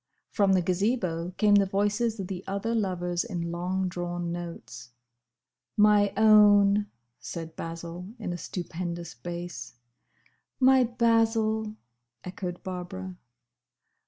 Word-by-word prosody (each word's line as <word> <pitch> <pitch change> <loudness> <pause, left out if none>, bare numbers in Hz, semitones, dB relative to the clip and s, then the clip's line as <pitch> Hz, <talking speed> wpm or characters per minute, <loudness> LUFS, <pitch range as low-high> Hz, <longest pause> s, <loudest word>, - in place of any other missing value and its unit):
From 200 -2 +3
the 185 -2 +3
Gazebo 180 -2 0
came 210 -1 +4
the 200 -1 +5
voices 205 +3 0
of 195 - -3
the 185 0 -6
other 200 +4 -2
lovers 180 -4 -1
in 175 -7 -4
long 185 +2 -1
drawn 175 -1 -4
notes. 170 -8 -7 0.9
"My 210 -1 +5
own!" 205 -1 +6 0.3
said 165 -1 -7
Basil, 170 +2 -6
in 215 -6 -4
a - - -4
stupendous 175 -1 -5
bass. 175 -8 -7 0.8
"My 260 0 +6
Basil!" 225 -2 +1 0.5
echoed 180 -1 -6
Barbara. 185 0 -6
190 Hz, 110 wpm, -27 LUFS, 175-210 Hz, 0.9 s, own